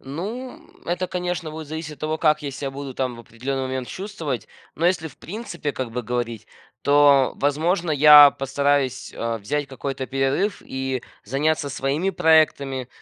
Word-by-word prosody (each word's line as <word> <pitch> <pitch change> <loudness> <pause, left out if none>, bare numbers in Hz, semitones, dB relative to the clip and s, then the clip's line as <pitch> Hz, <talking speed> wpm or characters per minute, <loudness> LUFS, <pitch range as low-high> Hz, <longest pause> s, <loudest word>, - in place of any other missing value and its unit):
Ну, 210 - -6 0.2
это, 180 +1 -2
конечно, 180 -2 -3
будет 155 0 -7
зависеть 160 0 -6
от - - -26
того, 155 +1 -2
как 155 -1 +2
я 140 - -3
себя 140 0 -4
буду, 135 -1 -7
там, 130 -2 -2
в - - -10
определенный 130 +4 -4
момент 130 -2 -3
чувствовать. 160 - -5 0.3
Но, 170 - +1
если 175 -3 +1
в - - -18
принципе 175 -7 -5
как 130 -3 -4
бы 125 +1 -3
говорить, 120 -1 -3 0.4
то, 140 -2 +5
возможно, 160 +5 0
я 150 -1 +9
постараюсь, 135 -1 0
э, 115 0 -3
взять 145 +7 -2
какой-то 135 0 -5
перерыв 135 +10 0
и 130 -1 -3 0.2
заняться 145 +5 0
своими 140 +7 -1
проектами. 140 -6 +2
145 Hz, 160 wpm, -23 LUFS, 130-160 Hz, 0.4 s, я